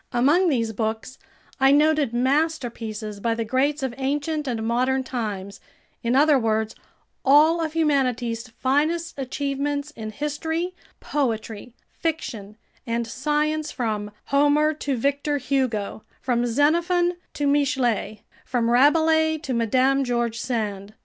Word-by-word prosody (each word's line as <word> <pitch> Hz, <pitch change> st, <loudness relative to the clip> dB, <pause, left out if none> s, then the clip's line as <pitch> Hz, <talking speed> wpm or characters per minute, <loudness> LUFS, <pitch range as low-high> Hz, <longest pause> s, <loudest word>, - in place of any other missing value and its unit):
Among 295 Hz, +9 st, +3 dB
these 230 Hz, -6 st, 0 dB
books 220 Hz, +4 st, -3 dB, 0.4 s
I 270 Hz, 0 st, +5 dB
noted 300 Hz, -2 st, +3 dB
masterpieces 240 Hz, -6 st, -1 dB
by 230 Hz, +2 st, 0 dB
the 230 Hz, 0 st, -2 dB
greats 270 Hz, +5 st, 0 dB
of 260 Hz, -2 st, -2 dB
ancient 295 Hz, +2 st, -1 dB
and 225 Hz, -3 st, -2 dB
modern 255 Hz, +3 st, +1 dB
times, 205 Hz, -6 st, -4 dB, 0.4 s
in 235 Hz, +2 st, 0 dB
other 290 Hz, 0 st, +5 dB
words, 220 Hz, -1 st, 0 dB, 0.5 s
all 305 Hz, +5 st, +5 dB
of 315 Hz, -1 st, -3 dB
humanity's 250 Hz, -7 st, 0 dB
finest 300 Hz, +8 st, 0 dB
achievements 280 Hz, +2 st, -2 dB
in 220 Hz, -6 st, -7 dB
history, 320 Hz, -, -3 dB, 0.3 s
poetry, 230 Hz, -4 st, -3 dB, 0.2 s
fiction, 230 Hz, -11 st, -4 dB, 0.3 s
and 235 Hz, 0 st, -1 dB
science, 300 Hz, +5 st, -1 dB
from 215 Hz, -5 st, -2 dB, 0.2 s
Homer 295 Hz, +2 st, +4 dB
to 285 Hz, -3 st, -3 dB
Victor 285 Hz, +4 st, 0 dB
Hugo, 250 Hz, -7 st, -1 dB, 0.2 s
from 245 Hz, -1 st, 0 dB
Xenophon 340 Hz, +7 st, +2 dB, 0.2 s
to 290 Hz, -, -1 dB
Michelet, 260 Hz, -7 st, +1 dB, 0.2 s
from 235 Hz, -2 st, 0 dB
Rabelais 315 Hz, +4 st, +4 dB
to 265 Hz, -, -2 dB
Madame 255 Hz, +4 st, +2 dB
George 240 Hz, -2 st, -1 dB
Sand. 210 Hz, -4 st, -3 dB
265 Hz, 125 wpm, -24 LUFS, 230-295 Hz, 0.5 s, I